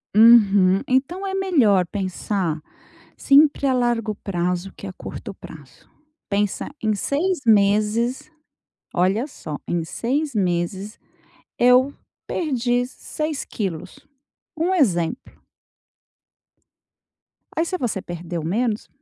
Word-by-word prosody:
Uhum. 205 -4 +6
Então, 280 +10 0
é 385 - -3
melhor 275 - +3
pensar 185 -3 -2 0.6
sempre 285 0 +4
a 260 - +3
largo 235 -3 0
prazo, 180 -1 -2
que 200 - -8
a 185 - -7
curto - - -8
prazo. - - -14 0.4
Pensa 205 0 -1
em 215 -1 +1
6 335 - -1
meses, 220 +7 +2 0.6
olha 190 +7 +1
só, 155 - -7
em 175 -1 -1
6 275 - -2
meses, 190 +2 -2 0.6
eu 250 +3 +5 0.3
perdi 245 -5 0
6 305 +3 -5
quilos. 185 - -5 0.6
Um 345 +4 +1
exemplo. 200 - 0 2.1
Aí 325 - +1
se 370 +2 -2
você 235 - -2
perdeu 170 -2 -6
menos, 215 +5 -1
220 Hz, 105 wpm, -22 LUFS, 190-270 Hz, 2.1 s, Uhum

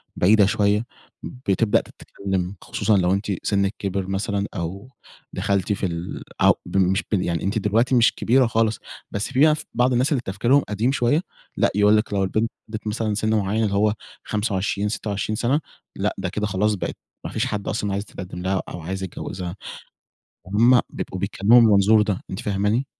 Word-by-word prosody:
بعيدة 105 +3 +5
شوية، 105 +2 +1 0.4
بتبدأ 115 -4 +1
تتكلّم، 95 -1 -5
خصوصًا 105 0 +1
لو 90 0 +2
أنتِ 100 +1 -1
سنِّك 100 0 +1
كبِر 95 -1 -2
مثلًا 100 +1 -1
أو 95 +6 -5 0.4
دخَلتِ 100 0 0
في 100 - -2
ال 85 -1 -4 0.2
أو - - +7
ب - - -3
مش 95 +2 +2
ب 100 -4 +2
يعني 85 -2 -2
أنتِ 105 +3 0
دلوقتي 115 +6 +2
مش 120 -1 +4
كبيرة 125 +2 +3
خالص، 110 -1 +1 0.3
بس 100 +4 -3
في 130 - -1
ناس 155 +1 +4
بعض 125 +2 +2
الناس 130 +5 +2
اللي 135 -5 +1
تفكيرهم 120 +9 +2
قديم 110 +5 +1
شوية 135 +5 +2 0.4
لأ، - - +3
يقول 105 +1 +5
لِك 105 -1 -1
لو 100 -1 +1
البنت 110 +4 0 0.2
بلَغِت 110 0 -6
مثلًا 110 0 -1
سِن 110 +1 0
معيّن 105 +2 0
اللي 100 -2 0
هو 105 +1 +3 0.3
25، 105 -1 -1
26 105 0 -3
سَنة، 125 +7 +1 0.4
لأ - - -1
ده - - -3
كده 105 - -2
خلاص 105 +2 +1
بقِت 100 - -4 0.3
ما - - -4
فيش - - -1
حد 105 -1 -4
أصلًا 105 -1 -1
عايز 100 - -2
يتقدِّم 90 -4 -8
لها 95 +1 0
أو 90 - -7
عايز 95 +4 -4
يتجوّزها. 90 0 -6 0.9
هُم 120 +5 +5
بيبقوا 95 - -5
بيتكلّموا 100 +4 +4
من 115 - +6
المنظور 105 +1 +5
ده، 105 -3 -1
أنتِ 95 - -4
فاهماني؟ 105 +6 0
105 Hz, 185 wpm, -23 LUFS, 95-110 Hz, 0.9 s, أو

